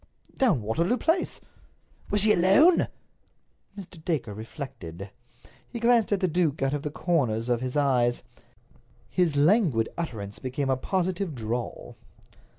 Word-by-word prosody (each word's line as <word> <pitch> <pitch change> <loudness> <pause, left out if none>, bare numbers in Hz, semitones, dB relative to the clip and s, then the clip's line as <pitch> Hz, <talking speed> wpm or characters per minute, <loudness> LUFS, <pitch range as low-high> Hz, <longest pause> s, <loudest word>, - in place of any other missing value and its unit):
"Down 195 - +2
Waterloo 170 - 0
Place." 335 +5 0 0.7
"Was 205 - +3
she 215 +1 +5
alone?" 205 - +5 0.9
Mr. 175 -4 -11
Dacre 145 -11 -2
reflected. 100 - -8 0.6
He 235 - -6
glanced 235 -2 +3
at 200 -1 +1
the 185 - +2
duke 160 -4 0
out 135 +1 +1
of 145 - -2
the 150 - -3
corners 130 -9 0
of 120 -1 +1
his 130 +2 -3
eyes. 125 -4 +2 0.9
His 175 -5 +1
languid 150 - +3
utterance 105 -11 -5
became 135 +1 -2
a - - +3
positive 185 +3 -2
drawl. 120 +1 -5
150 Hz, 135 wpm, -26 LUFS, 120-185 Hz, 0.9 s, she